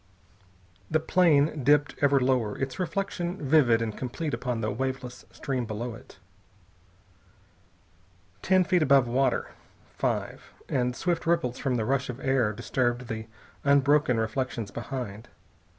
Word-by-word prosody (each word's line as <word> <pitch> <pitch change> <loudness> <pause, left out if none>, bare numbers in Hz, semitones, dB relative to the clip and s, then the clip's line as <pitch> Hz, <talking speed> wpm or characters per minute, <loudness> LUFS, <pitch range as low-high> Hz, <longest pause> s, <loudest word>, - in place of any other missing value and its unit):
The 155 - +2
plane 155 -3 +3
dipped 145 +2 +3
ever 140 -1 +4
lower, 125 -5 +1
its 135 -1 -4
reflection 180 0 -2
vivid 130 -7 +3
and 110 -2 -4
complete 145 +5 -4
upon 125 -3 -2
the 110 - -1
waveless 130 +1 -4
stream 130 -4 -3
below 115 +2 -4
it. 115 - -14 2.2
Ten 185 -1 +4
feet 180 0 +2
above 135 -3 +5
the 120 - -6
water. 135 +2 +1 0.5
Five - - -2
and 125 -1 0
swift 170 0 -1
ripples 165 -8 +1
from 130 -3 0
the 110 -3 -1
rush 135 +1 0
of 125 +1 -5
air 135 -5 +1
disturbed 120 +2 -2
the 110 -1 -5 0.4
unbroken 140 -2 +3
reflections 110 -1 -2
behind. 120 -3 -6
130 Hz, 135 wpm, -27 LUFS, 120-145 Hz, 2.2 s, above